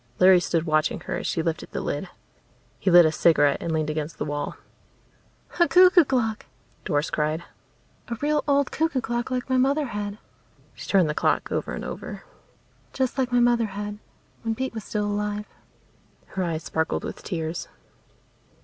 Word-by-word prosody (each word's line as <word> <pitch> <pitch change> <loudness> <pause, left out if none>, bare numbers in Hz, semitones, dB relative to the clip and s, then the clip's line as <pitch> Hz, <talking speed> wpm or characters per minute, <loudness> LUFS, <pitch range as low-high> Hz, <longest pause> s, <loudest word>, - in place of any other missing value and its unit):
Larry 185 0 +7
stood 165 -2 0
watching 155 -1 +1
her - - -4
as - - -4
she 165 - -1
lifted 165 -1 -3
the - - -4
lid. - - -3 0.7
He 195 - +1
lit 175 -1 +8
a 155 - +3
cigarette 145 -3 +3
and 170 - -3
leaned 155 -1 0
against 155 0 -4
the - - -3
wall. 145 0 -4 1.0
"A 345 - +6
cuckoo 360 -1 +7
clock!" 230 -5 -1 0.4
Doris 150 -3 0
cried. 155 +2 -1 0.6
"A 235 - -3
real 295 +4 0
old 280 -1 +2
cuckoo 320 -4 0
clock 240 0 -2
like 255 -1 -2
my 260 -1 +1
mother 280 +4 +2
had." 205 -3 -4 0.6
She - - -10
turned 190 -5 +4
the 150 - -1
clock - - 0
over - - -2
and - - -6
over. - - -7 0.7
"Just 260 0 -1
like 255 -1 0
my 245 - +3
mother 240 -1 +3
had, 205 +1 -6 0.4
when 225 -1 -2
Pete 260 +2 -3
was 220 -2 -6
still 210 -1 -2
alive." 210 0 -2 0.8
Her 190 - -2
eyes 165 -2 -3
sparkled 160 0 -1
with - - -6
tears. 165 -2 -4
205 Hz, 175 wpm, -25 LUFS, 160-250 Hz, 1.0 s, lit